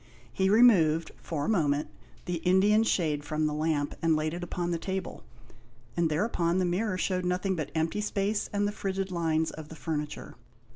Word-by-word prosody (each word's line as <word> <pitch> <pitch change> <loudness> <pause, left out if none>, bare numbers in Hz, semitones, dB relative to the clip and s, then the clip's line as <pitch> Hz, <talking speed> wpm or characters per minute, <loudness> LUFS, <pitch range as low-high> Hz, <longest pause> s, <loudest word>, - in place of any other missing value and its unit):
He 190 0 +1
removed, 185 -8 +5
for 150 -4 -3
a - - -3
moment, 150 -8 +1 0.4
the 175 -1 -2
Indian 190 +5 +4
shade 155 -9 0
from 155 +1 -1
the 150 - 0
lamp, 150 -1 0
and 165 -1 +3
laid 155 +1 -1
it 175 - -5
upon 175 0 -3
the 170 - -1
table, 190 0 -4 0.7
and 170 -2 +2
thereupon 170 0 0
the 185 - +2
mirror 185 +3 0
showed 185 0 -1
nothing 180 +2 0
but 155 -4 -3
empty 160 +6 0
space 205 0 -1
and 205 0 +1
the - - -1
frigid 195 -2 -3
lines 160 -2 0
of 155 -1 -9
the 160 - -9
furniture. 150 -2 -4
175 Hz, 185 wpm, -29 LUFS, 155-190 Hz, 0.7 s, removed